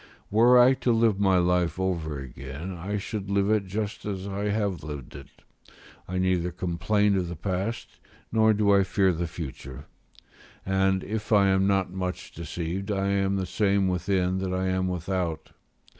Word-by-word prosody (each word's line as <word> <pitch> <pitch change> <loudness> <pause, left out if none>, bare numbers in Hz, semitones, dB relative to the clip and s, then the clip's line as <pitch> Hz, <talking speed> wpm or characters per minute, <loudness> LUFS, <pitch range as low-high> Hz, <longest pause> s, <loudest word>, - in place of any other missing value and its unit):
Were 120 +4 +6
I 125 +2 +7
to 125 - +2
live 115 -3 +2
my 95 -2 +4
life 90 -1 +1
over 85 -5 -2
again, 70 +6 -7
I 95 +5 -3
should 100 -1 -5
live 100 +1 +2
it 105 -3 +1
just 105 +2 -4
as 100 -2 -4
I 100 +1 -3
have 100 -6 -1
lived 75 -4 -7
it; - - -10 0.8
I 95 - -3
neither 90 -1 +1
complain 95 +4 +1
of 90 -3 -1
the 85 - -5
past, 95 +6 -4 0.3
nor 110 0 +4
do 100 -1 +3
I 100 - +5
fear 95 -1 +2
the 85 +1 -2
future; 70 -5 -8 0.8
and 95 0 +1
if 110 +1 -5
I 100 -2 +5
am 95 0 +3
not 95 -2 +1
much 90 -1 -4
deceived, 85 +4 -5
I 100 -1 0
am 100 0 +1
the 95 -1 -1
same 100 +1 +1
within 90 0 0
that 95 -1 -2
I 95 0 0
am 95 0 0
without. 90 -2 -3
95 Hz, 175 wpm, -26 LUFS, 90-100 Hz, 0.8 s, I